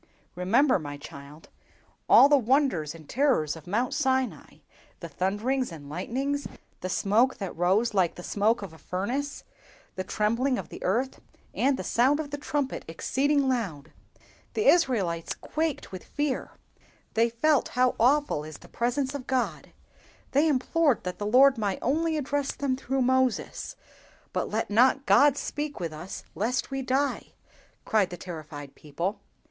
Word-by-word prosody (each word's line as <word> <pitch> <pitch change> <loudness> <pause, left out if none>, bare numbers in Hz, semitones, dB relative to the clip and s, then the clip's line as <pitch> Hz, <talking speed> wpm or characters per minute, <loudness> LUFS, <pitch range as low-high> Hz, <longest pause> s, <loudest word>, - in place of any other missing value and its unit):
"Remember, 225 +9 +3
my 145 -2 -6
child, 140 +2 -12 0.6
all 275 - +9
the 290 - +5
wonders 245 - +1
and 160 -3 -13
terrors 250 - +1
of 160 0 -13
Mount 235 +7 0
Sinai—the 265 -3 -3
thunders 220 +6 -1
and 145 -4 -10
lightnings, 270 - -2 0.3
the 185 - -4
smoke 220 +7 +2
that 195 -3 -5
rose 195 +7 +2
like 185 -4 +2
the 175 - -9
smoke 210 +3 +1
of 185 -5 -8
a 160 - -15
furnace, 245 - -3 0.5
the 185 - -4
trembling 230 +7 0
of - - -6
the - - -10
earth, 245 +8 0 0.3
and 270 0 +2
the - - -4
sound 265 +5 +2
of 295 -2 -4
the 290 - -4
trumpet 285 -2 -2
exceeding 275 - +1
loud! 195 - -2 0.6
The 430 - 0
Israelites 215 - +2
quaked 315 -2 -3
with 185 -2 -7
fear; 290 -2 -2 0.6
they 230 +1 +3
felt 280 +5 +2
how 255 0 +4
awful 265 - +3
is 155 -1 -9
the - - -16
presence 255 +3 -1
of 275 -3 -6
God; 260 -1 -1 0.6
they 290 +4 +3
implored 290 -1 +2
that 180 0 -5
the 205 - -2
Lord 260 +3 +6
might 200 -3 -1
only 315 +5 +1
address 285 -1 -1
them 275 -2 -1
through 265 0 -1
Moses—'But 260 -1 -2
let - - -2
not 260 +5 +4
God 285 -1 +5
speak 295 -2 -4
with 165 -3 -4
us 175 +5 -7
lest 245 +7 -1
we 270 0 -2
die!' 265 +2 -1 0.5
cried 210 -4 +2
the 175 - -7
terrified 155 -5 -8
people. 170 +8 -4
245 Hz, 155 wpm, -27 LUFS, 185-275 Hz, 0.6 s, all